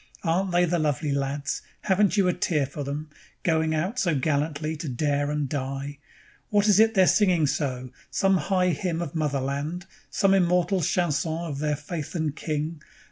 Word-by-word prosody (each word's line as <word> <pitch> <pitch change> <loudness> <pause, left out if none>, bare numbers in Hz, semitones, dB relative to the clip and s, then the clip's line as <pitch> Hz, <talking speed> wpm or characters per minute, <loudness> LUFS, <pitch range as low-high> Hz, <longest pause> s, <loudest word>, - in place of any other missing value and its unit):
Aren't 185 +3 +1
they 175 0 +4
the 175 0 0
lovely 150 -1 0
lads! 140 +1 -2 0.2
Haven't 205 0 +2
you 195 -2 +4
a 180 - +3
tear 160 -5 0
for 140 +2 -6
them 150 +2 -5 0.3
Going 160 -1 +1
out 190 +11 -1
so 170 -9 +1
gallantly 150 +2 -1
to 155 -2 -5
dare 145 +2 0
and 150 -1 -1
die? 140 +1 -4 0.5
What 205 0 +3
is 205 -1 +5
it 225 0 +5
they're 190 -1 +6
singing 180 -6 +3
so? 130 -3 -2 0.2
Some 195 -1 +2
high 180 +2 +1
hymn 170 +1 -1
of 145 - -6
Motherland? 145 +3 -2 0.2
Some 195 -1 +2
immortal 180 0 +2
chanson 160 -2 0
of 145 -4 -4
their 150 0 0
Faith 155 +1 -6
and 155 -3 -1
King? 155 0 -3
155 Hz, 175 wpm, -26 LUFS, 145-180 Hz, 0.5 s, they're